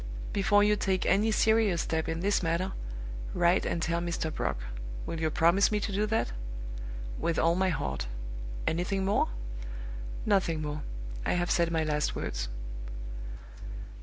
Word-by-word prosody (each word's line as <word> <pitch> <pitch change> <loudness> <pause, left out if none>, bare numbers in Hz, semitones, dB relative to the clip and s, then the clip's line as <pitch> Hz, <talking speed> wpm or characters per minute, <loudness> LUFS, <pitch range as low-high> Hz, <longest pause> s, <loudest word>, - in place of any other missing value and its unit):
"Before 205 +1 +5
you 210 0 +5
take 190 -2 +1
any 205 +4 +4
serious 220 -5 +4
step 160 -1 -1
in 165 +1 -1
this 200 +2 +3
matter, 175 +3 +1 0.6
write 175 +1 +4
and 170 - 0
tell 170 +1 +1
Mr. 165 -2 -1
Brock. - - -1 0.5
Will 165 - -3
you 160 -1 +2
promise 170 +7 +4
me 210 - +2
to 205 - -2
do 205 +2 +1
that?" 225 +1 +1 0.9
"With 165 - +1
all 165 +1 +4
my 190 +1 +2
heart. 65 - -1 0.6
Anything 185 +4 +1
more?" 200 - +3 1.0
"Nothing 190 -6 +3
more. 150 0 -3 0.4
I - - +1
have 175 0 +1
said 170 -1 +3
my 165 -1 +1
last 150 -1 +1
words." - - -2
175 Hz, 150 wpm, -30 LUFS, 165-200 Hz, 1.0 s, Before